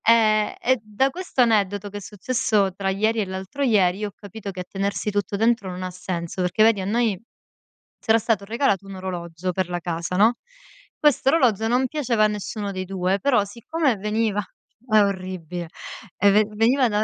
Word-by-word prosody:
Eh 215 -2 +4
e 260 0 +3
da 215 +6 +1
questo 360 -3 -2
aneddoto, 205 -3 +2
che 205 - -7
è - - -4
successo 210 -1 0
tra 195 +1 -2
ieri 215 +4 +1
e 210 - +1
l'altro 190 +8 -6
ieri, 195 -7 +3
io 210 - -2
ho - - -20
capito 205 0 -9
che 185 -1 -6
a - - -4
tenersi 200 +1 -2
tutto 205 0 -1
dentro 225 -2 +1
non 180 0 -6
ha 185 - -4
senso. 180 -1 -4
Perché 180 +4 +2
vedi 220 -3 +4
a - - -4
noi 220 -2 +1 0.8
c'era 220 0 +3
stato 220 -2 0
regalato 215 -3 0
un 195 0 -8
orologio 180 -1 -4
per 185 0 -1
la 175 0 -2
casa, 170 0 -3
no, 220 +4 +5 0.6
questo 295 -3 +3
orologio 235 -8 +3
non 250 +3 +2
piaceva 245 -6 +1
a - - +5
nessuno 210 0 -4
dei 185 -1 -4
2, 190 +1 -1
però 255 -5 +3
siccome 250 +6 -1
veniva 210 +1 0 0.5
è 215 -2 +5
orribile, 185 -3 -3 0.5
eh 200 - +5
ven 210 +1 +3
veniva 245 +4 +3
da 210 0 +1
205 Hz, 190 wpm, -23 LUFS, 190-225 Hz, 0.8 s, no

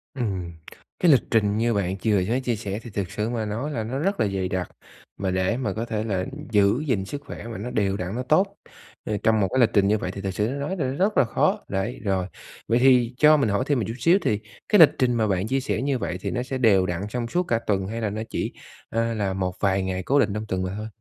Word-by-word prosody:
Ừm, 95 -8 -3 0.5
cái 175 -3 +5
lịch 135 - +6
trình 105 -2 +2
như 115 0 +1
bạn 95 -1 -1
chừa 105 -1 +2
với 125 +3 +1
chia 120 -3 -1
sẻ 100 0 -4
thì 120 - -9
thực 95 -3 -4
sự 110 +2 -2
mà 115 -3 -2
nói 115 +9 -3
là 115 -6 -2
nó 130 +5 -3
rất 195 +5 0
là 110 - +3
dày 95 -1 -2
đặc, 95 -1 -3 0.5
mà 95 -2 -1
để 95 +5 0
mà 110 -7 -2
có 115 +2 -3
thể 110 -2 -2
là 95 -4 -1 0.3
giữ 105 +7 +3
gìn 100 -7 0
sức 140 +7 -6
khỏe 115 - -8
mà 115 - -6
nó 115 +5 -5
đều 100 -2 0
đặn, 90 +4 -4
nó 125 - -2
tốt, 190 +9 +2 0.5
ơ, 105 -1 -1
trong 110 -1 +3
một 95 - +2
cái 130 - +2
lịch 120 - +5
trình 100 -1 +4
như 105 +1 +3
vậy 90 - -4
thì 100 - -7
thực 95 0 -2
sự 105 +3 0
nói 140 +8 -3
là 135 -5 0
rất 195 +9 0
là - - +6
khó, - - 0
đấy, 95 +5 -3
rồi. 95 -2 0 0.4
Vậy 115 +2 +3
thì 125 -2 +4
cho 150 0 +6
mình 115 -7 +1
hỏi 100 +5 +1
thêm 145 -4 +2
một 105 - -1
chút 115 - -3
xíu, 180 +4 +4
thì 105 -1 0 0.3
cái 210 - +5
lịch 160 - +10
trình 125 -2 +2
mà 110 -2 +1
bạn 95 +1 0
chia 135 +2 +1
sẻ 130 - -2
như 135 -1 0
vậy 90 - -3
thì - - -3
nó 125 0 -1
sẽ 130 0 -4
đều 100 -7 +4
đặn 90 0 -2
trong 120 0 -3
suốt 180 +7 0
cả 115 -9 0
tuần 95 -4 -1
hay 115 +2 -4
là 105 - 0
nó 110 +2 -4
chỉ, - - -3 0.4
ờ, 115 0 0
là 100 -3 -1
một 95 -1 -2
vài 95 -1 +1
ngày 95 -1 -3
cố 140 +6 +2
định 105 -6 +2
trong 105 +1 -3
tuần 95 -1 -1
mà 95 +1 -3
thôi? 110 +1 -5
110 Hz, 280 wpm, -24 LUFS, 95-125 Hz, 0.5 s, lịch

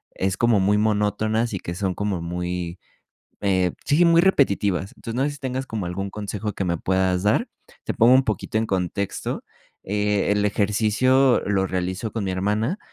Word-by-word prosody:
es 95 0 -1
como 115 -4 +3
muy 100 +2 +3
monótonas 110 +2 +1
y 95 - -2
que 85 - -6
son 95 -1 -2
como 100 -4 -2
muy, 90 0 -4 0.6
eh, 95 -3 +1
sí, 155 +5 +4
muy 170 0 +6
repetitivas. 100 - +2
Entonces 115 - -7
no 130 - +1
sé 145 - 0
si 145 - -9
tengas 130 0 -3
como 110 -7 -4
algún 95 +3 -4
consejo 105 +1 -4
que 100 - -3
me 85 -1 0
puedas 95 +1 0
dar, 105 - +2 0.4
te - - -2
pongo 115 +2 +5
un 130 +1 +5
poquito 110 -1 -2
en 110 - 0
contexto. 95 0 -2 0.4
Eh, 105 0 +1
el 105 0 +1
ejercicio 110 +6 +3
lo 95 -2 +1
realizo 95 +4 -3
con 110 -1 -3
mi 95 - -2
hermana, 105 - -1
105 Hz, 180 wpm, -23 LUFS, 95-115 Hz, 0.6 s, muy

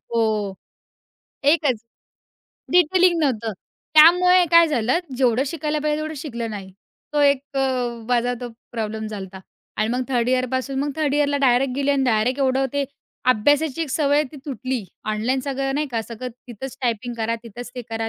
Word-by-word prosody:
हो. 215 -3 0 0.9
एकच. 290 -6 +3 0.9
डिटेलिंग 355 0 +4
नव्हतं 230 -7 0 0.4
त्यामुळे 360 +3 +7
काय 335 0 +7
झालं, 250 +1 +1 0.2
जेवढं 250 0 +2
शिकायला 305 0 -2
पाहिजे 300 0 +1
तेवढं 310 0 -4
शिकलं 235 -6 -5
नाही. 195 -3 -7 0.4
तो 295 - +1
एक 280 -2 +4
अ, - - +2 0.5
माझा 245 0 +1
तो 245 - -5 0.2
प्रॉब्लेम 220 -1 -3
झाला 205 -3 -5
होता. 190 0 -11 0.4
आणि 215 - 0
मग 250 +2 0
3rd 245 -2 +1
यिअरपासून 260 +1 0
मग 285 +1 0
3rd 295 -3 0
यिअरला 290 -1 +2
डायरेक्ट 250 +1 +2
गेली 280 0 +1
आणि 275 -1 +2
डायरेक्ट 245 +2 +1
एवढं 265 0 +2
ते 285 -1 0 0.5
अभ्यासाची 290 +6 +2
एक 320 - -4
सवय 290 0 +2
ती - - -9
तुटली. 255 -4 -3 0.2
ऑनलाईन 220 +5 0
सगळं, 270 0 -2
नाही 300 +1 0
का, 230 -3 -2
सगळं 235 +3 -7 0.2
तिथंच 250 +3 -8
टायपिंग 240 0 -1
करा. 230 0 -1
तिथेच 240 +1 -9
ते 245 - -5
करा. 225 0 -2
260 Hz, 165 wpm, -22 LUFS, 230-290 Hz, 0.9 s, त्यामुळे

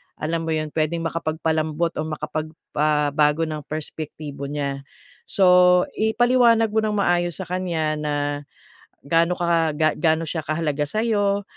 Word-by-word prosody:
alam 165 +1 -2
mo 160 - -1
'yon 155 -1 -2
pwedeng 160 +1 -1
makapagpalambot 160 0 -1
o - - 0
makapag, 155 0 -4 0.3
ah, 150 -1 +2
bago 150 +2 +2
ng 150 -2 -5
perspektibo 150 -1 -6
niya. 140 -1 -4 0.4
So, 180 -1 +5
ipaliwanag 230 0 +3
mo 220 - +1
nang 210 -1 -1
maayos 175 -2 +1
sa 185 - -8
kanya 165 -4 -1
na 150 -1 -2 0.9
gaano 165 +3 +3
ka 170 -3 +2
ga 155 0 +1
gaano 160 -1 +2
siya 160 0 -3
kahalaga 155 -2 -1
sa'yo 205 +2 0
160 Hz, 140 wpm, -22 LUFS, 155-180 Hz, 0.9 s, So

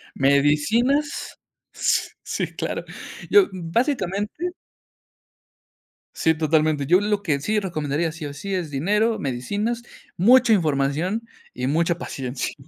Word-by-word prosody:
Medicinas, 150 - +2 0.4
s - - +1
sí, - - -2
claro. - - -3 0.5
Yo, 410 -2 +6
básicamente 205 - -1 1.6
Sí, 160 - +2
totalmente, 155 -2 +1
yo 180 +7 +4
lo 210 -1 0
que 150 -8 0
sí 210 +7 +1
recomendaría, 160 -3 -2
sí 160 -1 -7
o 145 - -6
sí, 195 +7 -5
es 170 -5 -3
dinero, 210 +10 +1
medicinas, 205 - -2 0.3
mucha 230 +4 +5
información, 160 +6 0 0.3
y 125 +1 -3
mucha 165 +3 +1
paciencia. 130 -6 -4
170 Hz, 115 wpm, -23 LUFS, 145-215 Hz, 1.6 s, Yo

